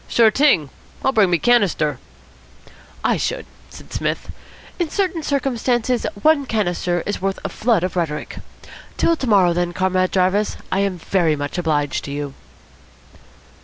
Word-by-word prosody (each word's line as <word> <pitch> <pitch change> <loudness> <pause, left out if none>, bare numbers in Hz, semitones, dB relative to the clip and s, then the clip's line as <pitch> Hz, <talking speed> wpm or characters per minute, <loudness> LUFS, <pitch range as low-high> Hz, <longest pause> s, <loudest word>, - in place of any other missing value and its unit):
"Sure 225 -2 +4
t'ing. 235 - +3 0.3
I'll 265 - +4
bring 215 -7 +4
me 175 - +3
canister." 185 -8 +2 1.0
"I - - +2
should," - - -2 0.2
said - - -13
Psmith. - - -2 0.5
"In 340 -3 0
certain 365 -2 -1
circumstances 250 -4 0 0.2
one 300 -3 +4
canister 175 -5 -1
is 205 - -3
worth 195 0 -1
a - - -1
flood 220 -6 +1
of 185 - -2
rhetoric. 160 -4 -3 0.6
Till 335 - +3
to 265 - -4
morrow, 190 -5 +4
then, 175 0 -1
Comrade 185 0 +1
Jarvis. 190 +3 +1
I 190 - +1
am 195 -2 0
very 165 -2 +1
much 145 +4 -4
obliged 150 -4 0
to 140 - -6
you." 145 -1 -4
195 Hz, 150 wpm, -20 LUFS, 175-245 Hz, 1.0 s, Sure